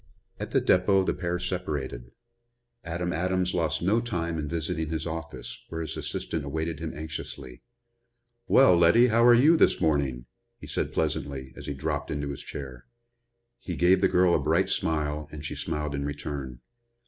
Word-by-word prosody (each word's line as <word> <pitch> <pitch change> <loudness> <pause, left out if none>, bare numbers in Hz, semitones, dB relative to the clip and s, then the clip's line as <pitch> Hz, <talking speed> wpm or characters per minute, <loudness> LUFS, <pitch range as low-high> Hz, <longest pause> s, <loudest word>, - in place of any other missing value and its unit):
At - - -4
the - - +3
depot 95 +1 +4
the - - 0
pair 90 -1 -2
separated. 75 -9 -4 0.7
Adam 85 +1 -3
Adams 90 +1 0
lost 80 -2 0
no 105 +6 +3
time 85 -8 -2
in 75 - -3
visiting 80 0 -2
his 80 -1 -3
office, 80 0 -6
where 80 0 -4
his 80 - -4
assistant 80 -3 -3
awaited 80 +3 -3
him - - -4
anxiously. 70 -5 -7 0.9
"Well, 130 -9 +6
Letty, 85 +9 +6
how 115 +1 +4
are 120 0 +8
you 150 +8 +6
this - - +4
morning?" 70 -6 0 0.3
he - - -11
said - - -2
pleasantly, 65 -2 -2
as - - -9
he 70 - -3
dropped 70 - -3
into 70 -1 -3
his 70 - -6
chair. 65 -3 -8 0.7
He 90 - -5
gave 90 +3 +4
the 95 - +5
girl 90 -1 +4
a - - +3
bright - - +1
smile 75 -1 -1
and 75 -1 -8
she - - -3
smiled 75 -1 -3
in 70 0 -2
return. 70 -3 -5
80 Hz, 170 wpm, -27 LUFS, 70-90 Hz, 0.9 s, are